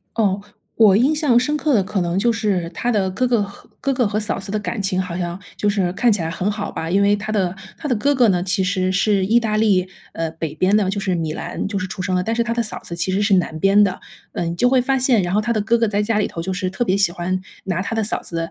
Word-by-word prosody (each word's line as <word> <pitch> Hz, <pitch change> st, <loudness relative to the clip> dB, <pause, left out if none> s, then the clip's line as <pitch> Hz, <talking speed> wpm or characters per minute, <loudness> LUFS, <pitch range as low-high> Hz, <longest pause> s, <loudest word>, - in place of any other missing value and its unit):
哦， 205 Hz, -3 st, +1 dB, 0.4 s
我 210 Hz, -4 st, +6 dB
印 265 Hz, +8 st, +3 dB
象 295 Hz, -6 st, +3 dB
深 295 Hz, +5 st, 0 dB
刻 295 Hz, -2 st, +1 dB
的 205 Hz, -, +4 dB
可 190 Hz, +1 st, -2 dB
能 175 Hz, +1 st, 0 dB
就 235 Hz, +3 st, +2 dB
是 200 Hz, -7 st, -1 dB
他 240 Hz, -, -2 dB
的 195 Hz, -5 st, +1 dB
哥 255 Hz, +7 st, 0 dB
哥 235 Hz, -4 st, +2 dB
和 200 Hz, 0 st, -10 dB
哥 275 Hz, -1 st, 0 dB
哥 250 Hz, -3 st, +2 dB
和 205 Hz, +1 st, -1 dB
嫂 215 Hz, -, -2 dB
子 195 Hz, 0 st, -7 dB
的 215 Hz, -, -1 dB
感 210 Hz, +1 st, -4 dB
情 190 Hz, -1 st, 0 dB
好 180 Hz, -2 st, -4 dB
像 175 Hz, 0 st, -3 dB, 0.2 s
就 210 Hz, -, 0 dB
是 190 Hz, -4 st, 0 dB
看 230 Hz, +3 st, +2 dB
起 200 Hz, -, 0 dB
来 160 Hz, -, -2 dB
很 185 Hz, +4 st, -1 dB
好 205 Hz, -1 st, -4 dB
吧， 165 Hz, -, -4 dB
因 195 Hz, +3 st, +3 dB
为 200 Hz, 0 st, +4 dB
他 215 Hz, +1 st, -5 dB
的 190 Hz, -4 st, 0 dB, 0.2 s
他 300 Hz, -, -5 dB
的 255 Hz, -, +2 dB
哥 285 Hz, +7 st, +2 dB
哥 245 Hz, -4 st, +4 dB
呢， 180 Hz, -2 st, +2 dB
其 190 Hz, +1 st, 0 dB
实 185 Hz, -1 st, 0 dB
是 195 Hz, 0 st, +2 dB
意 225 Hz, +4 st, +4 dB
大 220 Hz, -2 st, -1 dB
利， 195 Hz, -4 st, +2 dB, 0.2 s
呃， 165 Hz, -1 st, -3 dB
北 160 Hz, -2 st, -5 dB
边 185 Hz, +5 st, +2 dB
的 205 Hz, -3 st, +2 dB
就 200 Hz, +1 st, -2 dB
是 190 Hz, -2 st, -1 dB
米 160 Hz, -2 st, -2 dB
兰 -, -, -4 dB
就 200 Hz, -2 st, -2 dB
是 185 Hz, -, -3 dB
出 195 Hz, -1 st, -6 dB
生 185 Hz, 0 st, -1 dB
了， 180 Hz, -, +1 dB
但 225 Hz, +4 st, -1 dB
是 235 Hz, -, +1 dB
他 235 Hz, -, -2 dB
的 235 Hz, -, +1 dB
嫂 210 Hz, -, -5 dB
子 170 Hz, -, -8 dB
其 185 Hz, +2 st, -1 dB
实 200 Hz, +2 st, +1 dB
是 200 Hz, -1 st, +3 dB
南 165 Hz, -3 st, 0 dB
边 195 Hz, +1 st, +5 dB
的。 185 Hz, -2 st, -2 dB, 0.3 s
呃， -, -, -2 dB
你 170 Hz, 0 st, -2 dB
就 245 Hz, -, +3 dB
会 255 Hz, -1 st, +4 dB
发 265 Hz, +1 st, +1 dB
现， 245 Hz, -6 st, +3 dB
然 175 Hz, -, -2 dB
后 210 Hz, -, +3 dB
他 235 Hz, +2 st, -1 dB
的 215 Hz, -, 0 dB
哥 230 Hz, +3 st, +2 dB
哥 230 Hz, -, +2 dB
在 205 Hz, 0 st, 0 dB
家 210 Hz, 0 st, 0 dB
里 205 Hz, -, +1 dB
头 165 Hz, -, -6 dB
就 190 Hz, -, -3 dB
是 185 Hz, 0 st, -2 dB
特 190 Hz, +6 st, -1 dB
别 190 Hz, -3 st, +1 dB
喜 195 Hz, -4 st, +2 dB
欢 185 Hz, +2 st, -2 dB, 0.2 s
拿 185 Hz, -2 st, -1 dB
他 205 Hz, -, -3 dB
的 225 Hz, -, 0 dB
嫂 215 Hz, -, -2 dB
子， 165 Hz, -1 st, -4 dB
200 Hz, 330 characters per minute, -20 LUFS, 185-225 Hz, 0.4 s, 我